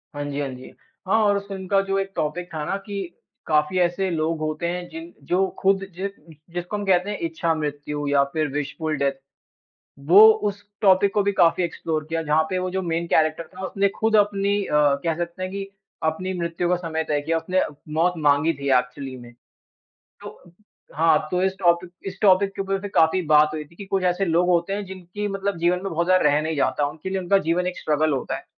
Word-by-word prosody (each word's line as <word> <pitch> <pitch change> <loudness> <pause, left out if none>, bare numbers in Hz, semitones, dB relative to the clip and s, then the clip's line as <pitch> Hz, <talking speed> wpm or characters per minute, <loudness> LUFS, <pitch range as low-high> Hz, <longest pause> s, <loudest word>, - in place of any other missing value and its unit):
हाँ 145 - -3
जी, 145 0 -4
हाँ 140 -1 -2
जी। 125 0 -11 0.4
हाँ 220 +4 +3
और 205 -1 +3
उस 200 0 -6
फ़िल्म 190 -2 -7
का 195 0 +3
जो 195 0 -1
एक 195 0 -3
टॉपिक 165 +3 -2
था 155 -1 -3
ना 195 - -1
कि 205 -1 -5 0.5
काफ़ी 150 +3 +2
ऐसे 180 +2 +1
लोग 160 -1 -1
होते 155 +2 -2
हैं 175 0 -4
जिन 330 +1 -9
जो 190 +2 +2
ख़ुद 195 0 +2
जिस 195 +2 -3 0.4
जिसको 175 +3 -4
हम 205 - -4
कहते 185 0 +2
हैं 205 - -3
इच्छा 165 +1 0
मृत्यु 145 -1 -4
या 140 -1 +4
फिर 155 -1 0
विशफुल 150 +2 -3
डेथ, 140 0 +1 0.9
वो 180 +10 +8
उस 205 -2 -3 0.2
टॉपिक 195 -1 +4
को 205 - +2
भी 200 - +1
काफ़ी 180 -2 +3
एक्सप्लोर 160 -2 -2
किया, 165 0 -1
जहाँ 155 +1 +2
पे 185 - -1
वो 185 0 -2
जो 190 +1 -1
मैन 170 -1 -2
करैक्टर 155 0 +1
था 190 +1 -5
उसने 200 +1 +1
खुद 220 0 +2
अपनी 200 -1 +2
अ, - - -5 0.3
कह 165 -1 0
सकते 175 +1 -4
है 185 - -3
कि 195 +1 -5 0.4
अपनी 170 +4 -1
मृत्यु 170 +1 -2
का 180 - +3
समय 165 -2 -3
तय 145 -1 +1
किया। 165 +3 0
उसने 180 +3 0 0.3
मौत 170 +3 +2
मांगी 150 +1 +3
थी 140 -1 -4
एक्चुअली 125 +1 -4
में। 120 -1 -13 0.9
तो 175 - -12 0.4
हाँ, 160 0 +4
तो 180 0 0
इस 190 0 +2
टॉपिक 175 0 +2 0.2
इस 195 0 -6
टॉपिक 195 0 +4
के - - -2
ऊपर 195 0 -2
से 205 - -5
काफ़ी 165 0 +3
बात 150 0 +6
हुई 155 -1 -4
थी 150 - -21
कि 200 - -8
कुछ 190 0 -1
ऐसे 180 +2 +1
लोग 175 0 +2
होते 175 +1 +2
हैं 205 +1 -2
जिनकी 190 +2 -6
मतलब 195 -2 -3
जीवन 175 +2 +1
में 195 - -3
बहुत 170 +1 0
ज़्यादा 185 0 +4
रह 145 +1 +3
नहीं 160 0 -2
जाता, 145 +1 +1
उनके 155 +5 -7
लिए 190 - -1
उनका 185 +2 +3
जीवन 180 +2 +1
एक 180 - -3
स्ट्रगल 155 0 +1
होता 135 - -2
है। - - -11
175 Hz, 220 wpm, -23 LUFS, 155-195 Hz, 0.9 s, वो